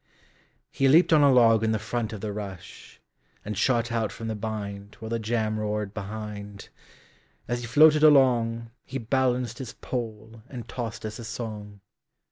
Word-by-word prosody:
He 135 - +2
leaped 165 +5 +5
on 155 - +6
a 140 -1 +6
log 115 -3 +5
in 110 0 +2
the - - +1
front 110 +1 -3
of 105 -3 -7
the 105 -1 -4
rush, 95 -4 -9 0.5
And 105 +1 -4
shot 120 +3 +1
out 115 -3 -1
from 115 0 -6
the 110 - -2
bindWhile 105 0 -6
the 115 - 0
jam 110 -1 -1
roared 105 -1 -2
behind; 105 -1 -7 0.8
As 120 +1 -2
he 120 - -6
floated 150 +4 +6
alongHe 120 -3 +2
balanced 125 -3 +1
his 125 -3 -7
poleAnd 115 0 -6
tossed 115 -3 -5
us 110 +1 -6
a - - -7
song. 105 -3 -7
115 Hz, 155 wpm, -26 LUFS, 105-120 Hz, 0.8 s, on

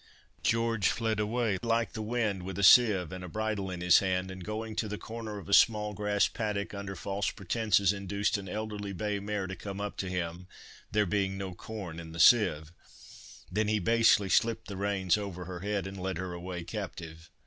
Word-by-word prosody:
George 115 -3 +1
fled 110 -2 0
away 105 -2 0
like 115 0 0
the 110 - -4
wind, 110 -3 -1
with 95 +1 -6
a 100 - -1
sieve 95 -5 +6
and 90 0 -7
a 90 - -7
bridle 110 -1 -2
in 90 -1 -5
his 90 -1 +6
hand, 95 -1 -1
and 95 -1 -8
going 110 +2 -5
to 110 - -1
the 105 0 -4
corner 110 -1 -6
of 100 - -9
a 100 - -2
small 105 -1 +4
grass 105 0 +1
paddock, 105 -3 -3
under 100 -1 -5
false 100 +2 -2
pretences 100 -1 +1
induced 100 +1 -1
an 100 -2 -4
elderly 105 -1 -4
bay 105 +2 -2
mare 100 -1 -3
to 95 0 -5
come 100 +1 -7
up 105 0 -4
to 95 - -3
him 90 0 -4 0.4
(there 105 0 +3
being 95 0 0
no 95 -1 -5
corn 90 -4 -7
in 80 -1 -9
the 85 - -7
sieve), 85 -8 +5 0.8
then 105 +3 +1
he 110 0 +2
basely 110 0 +4
slipped 115 +3 +1
the 100 - -6
reins 95 -1 +1
over 90 -3 -6
her 90 0 -6
head 100 +1 -2
and 95 -1 -7
led 95 -2 -2
her 90 0 -4
away 90 0 -5
captive. 85 -4 -7
100 Hz, 205 wpm, -30 LUFS, 95-110 Hz, 0.8 s, sieve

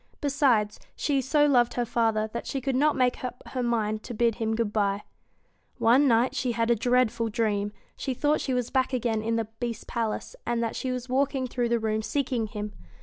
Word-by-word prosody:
Besides, 265 -7 +2 0.2
she 280 -2 +1
so 295 +3 +3
loved 245 -5 +3
her 245 - 0
father 225 -2 +1
that 235 - -4
she 270 - -2
could 265 0 -1
not 295 +3 +3
make 250 -1 +1
up 250 -1 -5
her 255 - -2
mind 220 -3 0
to 240 - -7
bid 235 +1 +3
him 220 0 +1
good 220 -2 -1
bye. 200 -1 +1 0.7
One 255 +5 +5
night 235 +1 +3
she 250 -3 0
had 230 0 +1
a - - +5
dreadful 240 -1 +1
dream. 210 -2 0 0.2
She 265 -2 -3
thought 295 +3 +1
she 260 - -1
was 250 -2 -1
back 260 0 +1
again 230 -3 0
in 225 +1 -1
the 225 -1 0
Beast's 240 -2 -4
palace, 230 - -3
and 235 -1 0
that 225 - -2
she 260 - -3
was 250 0 -4
walking 265 0 +1
through 245 -1 -1
the 235 - +3
rooms 220 -1 -1
seeking 255 -5 -1
him. 210 0 -5
240 Hz, 210 wpm, -27 LUFS, 225-260 Hz, 0.7 s, One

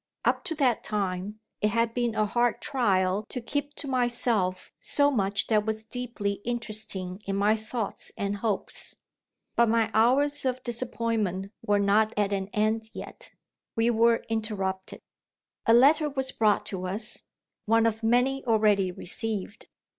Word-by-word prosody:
Up - - +2
to 335 -3 -2
that 260 -6 +2
time, 200 0 -2 0.2
it 210 - +3
had 230 +1 +1
been 240 -2 0
a 215 - +2
hard 240 +3 +1
trial 200 -7 +1
to 250 - -4
keep 285 +4 -3
to 290 - -7
myself 240 -7 0
so 285 0 +2
much 200 -5 0
that 215 -2 +2
was 220 0 -2
deeply 220 -4 -3
interesting 215 -5 -3
in 195 - -1
my 205 +2 +3
thoughts 220 -1 -5
and 200 0 -2
hopes. 205 -1 -3 0.6
But 235 -1 +4
my 225 -1 +2
hours 275 +6 +3
of 255 -1 -1
disappointment 225 -5 -2
were 205 0 +2
not 205 +2 +3
at 205 -1 +1
an 195 -1 -1
end 220 +1 0
yet. - - -9 0.5
We 230 +1 +3
were 230 0 +3
interrupted. 200 -4 -3 0.7
A 230 - +6
letter 295 +5 +5
was 265 -2 -2
brought 215 -2 +2
to 185 -2 -4
us 210 +4 -5 0.4
one 225 +1 +4
of 225 -1 0
many, 250 +4 +2
already 210 -4 +3
received! 205 +3 -4
220 Hz, 150 wpm, -27 LUFS, 200-240 Hz, 0.7 s, A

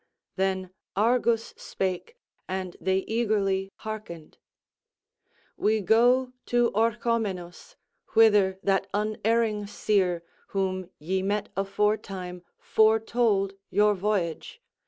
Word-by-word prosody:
Then 190 -1 -1 0.2
Argus 230 +2 +2
spake, 190 - -4 0.3
and 185 -1 -4
they 190 0 0
eagerly 205 -4 0 0.2
hearkened: 210 -8 -7 1.2
"We 215 +1 +2
go 245 +5 +3
to 240 -1 +2
Orchomenus, 225 - -1 0.4
whither 205 -4 +5
that 195 0 +1
unerring 215 0 0
seer, 190 -4 0 0.2
whom 185 -2 -2
ye 185 +5 -2
met 205 +2 -1
aforetime, 195 -2 -1 0.2
foretold 220 -2 +2 0.2
your 210 0 +4
voyage. 200 - -2
205 Hz, 90 wpm, -27 LUFS, 190-220 Hz, 1.2 s, whither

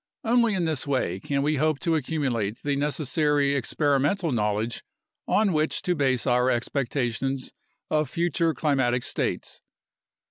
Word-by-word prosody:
Only 235 -2 +3
in 180 -3 0
this 155 -4 -2
way 130 -10 0
can 140 +6 -1
we 150 +1 +1
hope 155 +1 +1
to 165 -2 +1
accumulate 130 -9 -1
the 145 -1 0
necessary 145 0 +1
experimental 145 - +1
knowledge 105 0 -1 0.4
on 205 -3 +2
which 155 0 0
to 180 - +1
base 135 -6 +1
our 125 0 +3
expectations 130 +1 -1 0.4
of 155 -3 +1
future 170 0 0
climatic 130 -5 +1
states. - - -3
140 Hz, 135 wpm, -25 LUFS, 125-155 Hz, 0.4 s, Only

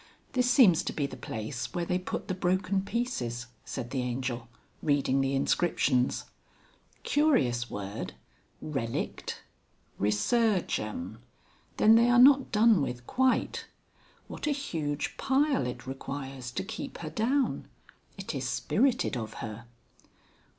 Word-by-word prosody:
"This 250 -1 +2
seems 225 - +6
to - - -2
be 145 - -1
the 140 - -6
place 120 - -5
where 175 -1 0
they 180 +1 0
put 185 - -5
the - - -1
broken 185 +2 +1
pieces," 190 - -2 0.2
said 120 -2 -6
the 130 - -1
Angel 125 -1 -3 0.3
reading 140 -2 +2
the 135 0 0
inscriptions. 135 -3 +1 0.8
"Curious 130 - +2
word 100 0 -5 0.5
relict! 135 -7 -3 0.6
Resurgam! 110 - 0 0.6
Then 220 - +6
they 235 +2 +6
are 245 - +5
not 270 +2 +7
done 220 -4 +5
with 125 -3 -3
quite. 260 - +1 0.6
What - - -5
a - - +2
huge 155 - -3
pile 270 - +2
it 125 -1 -6
requires 135 -1 -6
to - - -2
keep 225 +7 -6
her 155 - -5
down.... 255 - 0 0.5
It - - -5
is - - -2
spirited 265 - +1
of 110 -2 -5
her." 115 +1 -7
145 Hz, 130 wpm, -29 LUFS, -, 0.8 s, not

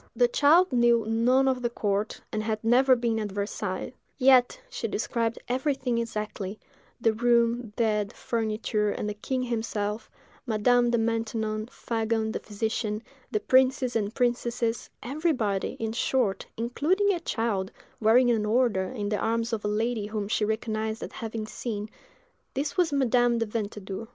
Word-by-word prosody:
The - - +4
child 360 - +4
knew 240 -2 +4
none 245 +4 +3
of 260 -1 +1
the 240 - 0
court, 210 -2 -1
and 215 - -1
had 215 0 -2
never 255 +3 +5
been 235 -2 0
at 210 -2 -3
Versailles; 200 +1 -3 0.2
yet 260 - +5
she - - -4
described 230 -1 -1
everything 255 -1 0
exactly—the 220 +2 -4
room, 235 0 +2
bed, 210 -3 +1
furniture, 215 -2 -1
and 210 - -3
the 210 - -2
king 255 +5 -2
himself, 220 -3 -2 0.4
Madame 240 +2 +3
de 235 - +2
Maintenon, 225 -1 -1
Fagon, 225 -2 -1
the - - -3
physician, 215 +1 -3 0.3
the 215 - 0
princes 260 0 +3
and 210 -1 -1
princesses—everybody, 240 - -1
in 225 -1 -2
short, 230 -4 0
including 330 - +1
a 350 - -2
child, 225 - -1 0.3
wearing 240 +3 +5
an 220 -2 +1
order, 215 -3 +2
in 205 -1 -4
the 210 - 0
arms 230 +1 0
of 215 - -2
a - - -1
lady 215 0 -1
whom 210 -1 -3
she 215 - 0
recognised 220 0 -2
as - - -6
having 225 -1 -5
seen; 215 -1 -4 0.7
this 285 +2 -2
was 355 -4 +2
Madame 245 -3 +3
de 230 - 0
Ventadour. 210 -1 -5
230 Hz, 150 wpm, -27 LUFS, 215-245 Hz, 0.7 s, never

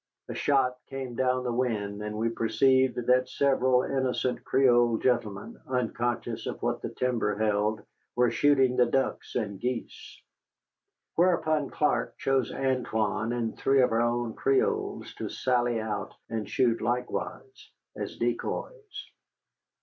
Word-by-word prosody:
A - - -3
shot 130 -3 +1
came 135 -2 -6
down 130 +1 +1
the 120 -1 -2
wind, 105 -5 -1
and 105 0 -4
we 115 +1 +1
perceived 130 +3 +2
that 125 +1 +3
several 130 -2 +2
innocent 130 -2 -1
Creole 120 -3 +4
gentlemen, 120 - -1
unconscious 120 -1 -2
of - - -4
what - - -1
the - - -4
timber 115 -5 -1
held, 105 0 0 0.3
were 125 -1 +3
shooting 135 -1 +3
the 125 - +5
ducks 135 +2 -1
and 100 -5 -2
geese. 125 0 -5 1.0
Whereupon 160 -4 +2
Clark 120 -6 0
chose 135 -1 0
Antoine 115 -4 -1
and 115 -2 -2
three 135 -1 +3
of 125 - +2
our 115 +1 +2
own 120 -1 0
Creoles 135 -1 0
to - - -3
sally 120 -2 0
out 110 -2 -4 0.2
and 110 -2 -3
shoot 120 -3 +1
likewise 125 - -4 0.3
as - - -6
decoys. 420 -4 -4
125 Hz, 135 wpm, -28 LUFS, 115-130 Hz, 1.0 s, the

